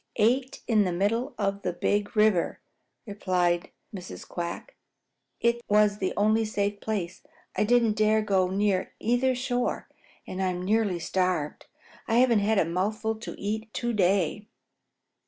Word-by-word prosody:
"Eight 250 Hz, +4 st, +1 dB
in 215 Hz, -3 st, +4 dB
the 185 Hz, -, -1 dB
middle 230 Hz, +9 st, 0 dB
of 200 Hz, -1 st, -1 dB
the 180 Hz, -, -2 dB
Big 205 Hz, +4 st, -1 dB
River," 210 Hz, -5 st, +3 dB, 0.5 s
replied 180 Hz, -4 st, 0 dB, 0.3 s
Mrs. 185 Hz, -1 st, -8 dB
Quack. 175 Hz, -, -5 dB, 0.6 s
"It 235 Hz, 0 st, +1 dB
was 210 Hz, 0 st, +3 dB
the 185 Hz, -, 0 dB
only 215 Hz, +2 st, +3 dB
safe 205 Hz, -1 st, -1 dB
place. 185 Hz, -5 st, -3 dB, 0.3 s
I -, -, +2 dB
didn't 235 Hz, -1 st, +3 dB
dare 215 Hz, 0 st, +3 dB
go 190 Hz, -3 st, +2 dB
near 195 Hz, 0 st, 0 dB
either 245 Hz, +3 st, +1 dB
shore, 245 Hz, -1 st, -2 dB, 0.4 s
and 185 Hz, -, -5 dB
I'm 180 Hz, -1 st, -1 dB
nearly 210 Hz, -2 st, +1 dB
starved. 175 Hz, -3 st, -1 dB, 0.4 s
I 225 Hz, -, +1 dB
haven't 240 Hz, -2 st, +5 dB
had 210 Hz, +2 st, +1 dB
a 180 Hz, -, +4 dB
mouthful 210 Hz, +6 st, -1 dB
to 225 Hz, -, -8 dB
eat 220 Hz, +2 st, -3 dB
to 240 Hz, -1 st, -1 dB
day." 195 Hz, 0 st, +1 dB
205 Hz, 145 wpm, -27 LUFS, 185-225 Hz, 0.6 s, haven't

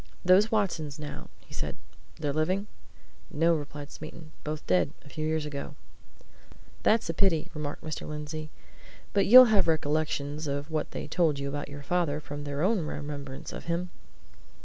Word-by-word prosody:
"Those 190 Hz, +4 st, +6 dB
Watsons, 170 Hz, -9 st, 0 dB
now," 150 Hz, -1 st, -7 dB
he -, -, -17 dB
said. -, -, -3 dB, 0.4 s
"They're 145 Hz, -3 st, -1 dB
living?" 185 Hz, +6 st, +1 dB, 0.6 s
"No," 165 Hz, +3 st, +3 dB
replied 145 Hz, -2 st, -5 dB
Smeaton. 155 Hz, 0 st, -9 dB
"Both 150 Hz, 0 st, -4 dB
dead 90 Hz, -5 st, +2 dB
a -, -, -12 dB
few 155 Hz, +2 st, -4 dB
years 155 Hz, -1 st, 0 dB
ago." 145 Hz, 0 st, -5 dB, 1.1 s
"That's 225 Hz, +1 st, +3 dB
a -, -, -8 dB
pity," 170 Hz, -3 st, +2 dB
remarked 150 Hz, -1 st, -5 dB
Mr. 155 Hz, -1 st, -5 dB
Lindsey. 150 Hz, +1 st, -5 dB, 0.6 s
"But 200 Hz, -, +3 dB
you'll 250 Hz, 0 st, +10 dB
have 195 Hz, -4 st, +5 dB
recollections 155 Hz, -1 st, 0 dB
of 140 Hz, +2 st, -3 dB
what 155 Hz, -1 st, -1 dB
they -, -, -5 dB
told 160 Hz, -5 st, +2 dB
you 140 Hz, 0 st, -3 dB
about 145 Hz, +1 st, -4 dB
your 145 Hz, 0 st, -8 dB
father 165 Hz, -2 st, +1 dB
from 145 Hz, 0 st, -7 dB
their 145 Hz, +1 st, -2 dB
own 210 Hz, +2 st, +3 dB
remembrance 145 Hz, -2 st, -6 dB
of -, -, -7 dB
him?" 170 Hz, +1 st, -2 dB
155 Hz, 165 wpm, -29 LUFS, 145-170 Hz, 1.1 s, you'll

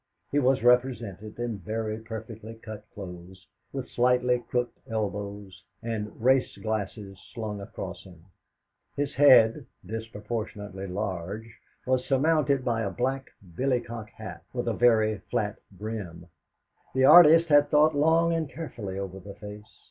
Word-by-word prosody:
He 145 Hz, -, +3 dB
was 130 Hz, -1 st, +2 dB
represented 120 Hz, -5 st, +1 dB
in 120 Hz, -3 st, -3 dB
very 110 Hz, +3 st, -3 dB
perfectly 110 Hz, 0 st, -8 dB
cut 110 Hz, -2 st, -10 dB
clothes, 90 Hz, -1 st, -10 dB, 0.3 s
with 135 Hz, -2 st, -5 dB
slightly 125 Hz, 0 st, +2 dB
crooked 120 Hz, 0 st, -3 dB
elbows, 100 Hz, -3 st, -4 dB, 0.2 s
and 110 Hz, -2 st, -4 dB
race 130 Hz, +2 st, +2 dB
glasses 100 Hz, -2 st, -4 dB, 0.2 s
slung 105 Hz, -3 st, -4 dB
across 95 Hz, -2 st, -7 dB
him. 90 Hz, -3 st, -16 dB, 0.7 s
His 145 Hz, 0 st, -2 dB
head, 130 Hz, -2 st, +6 dB, 0.2 s
disproportionately 105 Hz, -2 st, -5 dB
large, 100 Hz, +3 st, -4 dB, 0.3 s
was 130 Hz, 0 st, +1 dB
surmounted 140 Hz, -1 st, +2 dB
by 115 Hz, -2 st, 0 dB
a 100 Hz, -, -1 dB
black 130 Hz, +5 st, -2 dB, 0.3 s
billycock 120 Hz, -3 st, -2 dB
hat 95 Hz, -7 st, -9 dB
with 120 Hz, -1 st, -3 dB
a 115 Hz, -, +1 dB
very 110 Hz, -3 st, +3 dB
flat 105 Hz, 0 st, -1 dB
brim. 100 Hz, -4 st, -6 dB, 0.7 s
The 130 Hz, 0 st, +4 dB
artist 165 Hz, +1 st, +8 dB
had 145 Hz, -1 st, +5 dB
thought 155 Hz, +1 st, +5 dB
long 165 Hz, +3 st, +3 dB
and 160 Hz, -3 st, -1 dB
carefully 115 Hz, -, -6 dB
over 95 Hz, -1 st, -5 dB
the 100 Hz, +1 st, -10 dB
face. 105 Hz, -1 st, -11 dB
110 Hz, 135 wpm, -27 LUFS, 100-125 Hz, 0.7 s, artist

